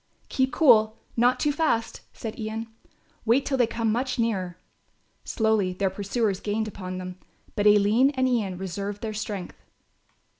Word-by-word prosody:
"Keep 260 Hz, 0 st, +1 dB
cool, 220 Hz, -7 st, +5 dB, 0.2 s
not 245 Hz, +2 st, +3 dB
too 295 Hz, -, +2 dB
fast," 285 Hz, -7 st, 0 dB
said 225 Hz, 0 st, -7 dB
Ian, 220 Hz, +1 st, -4 dB, 0.6 s
"wait 240 Hz, +5 st, +3 dB
till 275 Hz, -, 0 dB
they 240 Hz, -, +4 dB
come 230 Hz, -1 st, -1 dB
much 255 Hz, +4 st, -1 dB
nearer." 190 Hz, -7 st, -1 dB, 0.7 s
Slowly 220 Hz, -5 st, +1 dB
their 190 Hz, +1 st, 0 dB
pursuers 200 Hz, +1 st, -1 dB
gained 215 Hz, +1 st, -2 dB
upon 185 Hz, -3 st, -6 dB
them, 185 Hz, 0 st, -7 dB, 0.4 s
but 205 Hz, 0 st, +2 dB
Aline 210 Hz, +5 st, +5 dB
and 260 Hz, 0 st, +2 dB
Ian 210 Hz, -7 st, 0 dB
reserved 200 Hz, +3 st, -5 dB
their 220 Hz, -1 st, -3 dB
strength. 205 Hz, -3 st, -5 dB
220 Hz, 150 wpm, -26 LUFS, 200-235 Hz, 0.7 s, cool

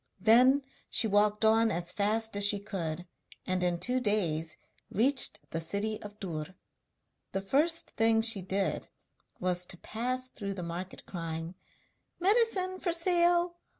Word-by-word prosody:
Then 250 Hz, +7 st, +5 dB, 0.3 s
she -, -, +3 dB
walked 210 Hz, +1 st, +2 dB
on 225 Hz, +1 st, +4 dB
as 170 Hz, -3 st, -1 dB
fast 220 Hz, +1 st, 0 dB
as 205 Hz, -, +1 dB
she 205 Hz, 0 st, +4 dB
could, 180 Hz, -5 st, -5 dB, 0.4 s
and 185 Hz, -1 st, 0 dB
in 175 Hz, -1 st, +1 dB
two 250 Hz, +5 st, 0 dB
days 175 Hz, -9 st, -1 dB, 0.3 s
reached 260 Hz, +6 st, +2 dB
the 165 Hz, -, -2 dB
city 200 Hz, +6 st, -1 dB
of 210 Hz, 0 st, -10 dB
Dûr. 165 Hz, -2 st, -6 dB, 0.8 s
The 195 Hz, -, -1 dB
first 310 Hz, +11 st, +1 dB
thing 225 Hz, 0 st, +2 dB
she 225 Hz, -3 st, +5 dB
did 190 Hz, +1 st, -2 dB, 0.5 s
was 180 Hz, -1 st, -1 dB
to 180 Hz, -, -4 dB
pass 255 Hz, +6 st, -2 dB
through 200 Hz, -5 st, -6 dB
the 180 Hz, -, -5 dB
market 175 Hz, +3 st, -7 dB
crying: 165 Hz, -1 st, -5 dB, 0.7 s
'Medicine 375 Hz, -2 st, +2 dB
for 350 Hz, -, -1 dB
sale! 345 Hz, 0 st, +2 dB
210 Hz, 145 wpm, -30 LUFS, 180-255 Hz, 0.8 s, Then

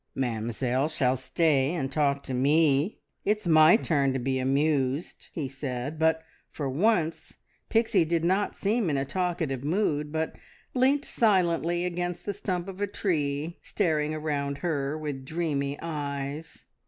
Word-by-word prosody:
"Mamzelle 125 Hz, +2 st, -1 dB
shall 130 Hz, -5 st, +1 dB
stay 140 Hz, +2 st, +1 dB
and 135 Hz, -5 st, -2 dB
talk 140 Hz, -1 st, +1 dB
to 130 Hz, -, -5 dB
me! 145 Hz, -, +2 dB, 0.2 s
It's 210 Hz, 0 st, 0 dB
my 160 Hz, +3 st, +7 dB
turn 140 Hz, -, +1 dB
to -, -, 0 dB
be 130 Hz, +1 st, -1 dB
amused," 140 Hz, +2 st, 0 dB
he 150 Hz, -5 st, -3 dB
said; 135 Hz, +2 st, -5 dB
but 160 Hz, 0 st, +2 dB, 0.3 s
for 145 Hz, -, -4 dB
once 165 Hz, +2 st, 0 dB, 0.3 s
Pixie 225 Hz, -6 st, +3 dB
did 165 Hz, 0 st, 0 dB
not 190 Hz, +4 st, +1 dB
seem 210 Hz, -1 st, 0 dB
in 145 Hz, -, +1 dB
a 135 Hz, -, 0 dB
talkative 160 Hz, -4 st, -2 dB
mood, 150 Hz, -3 st, 0 dB
but 160 Hz, 0 st, -2 dB, 0.4 s
leant 270 Hz, +3 st, +3 dB
silently 175 Hz, -5 st, +2 dB
against 175 Hz, 0 st, -3 dB
the 205 Hz, -, -2 dB
stump 185 Hz, -2 st, -3 dB
of 195 Hz, 0 st, -7 dB
a 205 Hz, -, +1 dB
tree, 155 Hz, -5 st, -2 dB
staring 155 Hz, -6 st, 0 dB
around 145 Hz, -2 st, -2 dB
her 145 Hz, -3 st, -1 dB
with 145 Hz, -4 st, -5 dB
dreamy 145 Hz, -2 st, -2 dB
eyes. 145 Hz, -1 st, -5 dB
155 Hz, 145 wpm, -27 LUFS, 140-175 Hz, 0.4 s, my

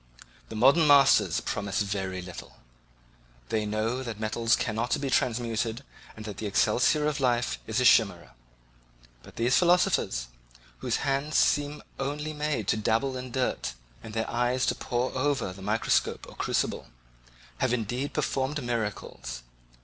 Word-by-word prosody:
The -, -, -7 dB
modern 140 Hz, +8 st, +5 dB
masters 140 Hz, -2 st, +5 dB
promise 100 Hz, 0 st, -1 dB
very 95 Hz, -2 st, -3 dB
little; 90 Hz, -1 st, -10 dB, 0.9 s
they 110 Hz, -1 st, 0 dB
know 110 Hz, +4 st, -1 dB
that 115 Hz, -5 st, -6 dB
metals 115 Hz, +1 st, +1 dB
cannot 115 Hz, +2 st, -1 dB
be 140 Hz, -2 st, -2 dB
transmuted 115 Hz, 0 st, 0 dB, 0.3 s
and 110 Hz, -, -9 dB
that 105 Hz, -2 st, -6 dB
the 110 Hz, -, -3 dB
elixir 125 Hz, +8 st, +2 dB
of 150 Hz, -1 st, 0 dB
life 120 Hz, -2 st, +1 dB
is 110 Hz, +2 st, 0 dB
a 125 Hz, -, +2 dB
chimera 110 Hz, -7 st, +4 dB, 0.9 s
but -, -, -15 dB
these 120 Hz, +3 st, +2 dB
philosophers, 175 Hz, -, +2 dB, 0.5 s
whose -, -, -1 dB
hands 140 Hz, +2 st, 0 dB
seem 145 Hz, 0 st, +2 dB, 0.2 s
only 150 Hz, +3 st, -3 dB
made 150 Hz, -8 st, -2 dB
to -, -, +2 dB
dabble 115 Hz, +5 st, 0 dB
in 130 Hz, 0 st, -6 dB
dirt, 120 Hz, -, -2 dB, 0.3 s
and 110 Hz, -, -9 dB
their 110 Hz, 0 st, -1 dB
eyes 125 Hz, +1 st, +1 dB
to -, -, +2 dB
pore 125 Hz, +1 st, -2 dB
over 135 Hz, -7 st, 0 dB
the 95 Hz, -, -12 dB
microscope 105 Hz, +3 st, 0 dB
or -, -, -13 dB
crucible, -, -, -1 dB, 0.7 s
have 130 Hz, -, +1 dB
indeed 125 Hz, +4 st, -2 dB
performed 135 Hz, +2 st, -1 dB
miracles. 105 Hz, -, -4 dB
120 Hz, 145 wpm, -28 LUFS, 110-135 Hz, 0.9 s, modern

